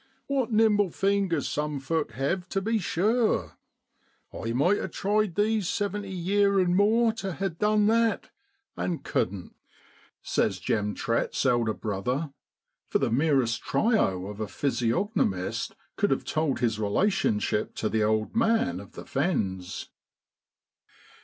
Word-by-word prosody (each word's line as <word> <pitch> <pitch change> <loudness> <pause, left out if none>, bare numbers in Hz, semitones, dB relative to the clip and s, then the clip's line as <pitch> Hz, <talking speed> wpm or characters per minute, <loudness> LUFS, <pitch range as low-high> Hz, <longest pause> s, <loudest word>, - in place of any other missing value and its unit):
W 270 -4 +1
T - - -13
hat 215 - +2
nimble 210 -3 +4
fingers 195 -4 0
some 150 -1 -2
folk 155 +3 -2
hev, 175 +8 -2
tu 195 - 0
be 220 +3 0
sure! 200 - +1 0.8
I 115 - -4
might 170 - +2
ha' - - -3
tried 205 -2 0
these 210 -2 +1
seventy 205 -1 -2
yeer 200 +2 +2
an' 180 -1 +2
more 220 +3 +4
to 195 -4 -4
ha' 195 -1 -3
done 210 +3 +2
that, 230 +1 +2 0.4
an' 170 -3 -3
cudden't,' 90 -2 -2 0.7
says - - 0
Jem 105 -1 -1
Trett's 115 +4 -1
elder 120 -4 +2
brother, 125 +8 -2 0.5
for - - +1
the - - 0
merest 130 -3 +2
tyro 95 - +1
of 105 +1 -7
a 110 - -2
physiogno 140 - 0
mist 95 -1 -4 0.2
could - - +2
have - - 0
told 155 -5 -1
his 115 -3 +1
relationship 110 - 0
to 110 - -1
the 110 0 0
old 110 - 0
man 230 +1 +2
of - - -12
the - - -9
fens. 95 - -2
175 Hz, 145 wpm, -27 LUFS, -, 0.8 s, nimble